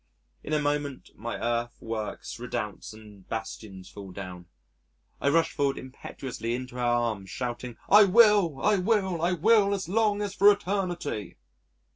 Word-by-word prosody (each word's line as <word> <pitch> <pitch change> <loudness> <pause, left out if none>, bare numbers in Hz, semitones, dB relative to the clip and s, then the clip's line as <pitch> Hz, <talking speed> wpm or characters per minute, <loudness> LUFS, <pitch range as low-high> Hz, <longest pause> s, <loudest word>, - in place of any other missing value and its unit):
In - - -7
a 155 - +3
moment 145 -2 -2
my 115 +3 -5
earth 120 0 -2
works, 110 -2 -5
redoubts, - - -5
and 105 -3 -15
bastions 105 -4 -6
fall 100 -2 -10
down, 90 -2 -8 0.7
I 140 - +3
rush 165 +3 +3
forward 140 -1 0
impetuously 130 -2 -6
into 125 0 -7
her - - -3
arms 120 -5 0
shouting, 120 -1 -5
"I 210 +1 +8
will, 200 - +5
I 210 -1 +4
will, 190 -3 +1
I 175 +2 +2
will 200 +3 +4
as 190 -4 -5
long 210 +1 +1
as 200 -1 -4
for 200 +1 +7
eternity." 180 - -3
140 Hz, 150 wpm, -27 LUFS, -, 0.7 s, I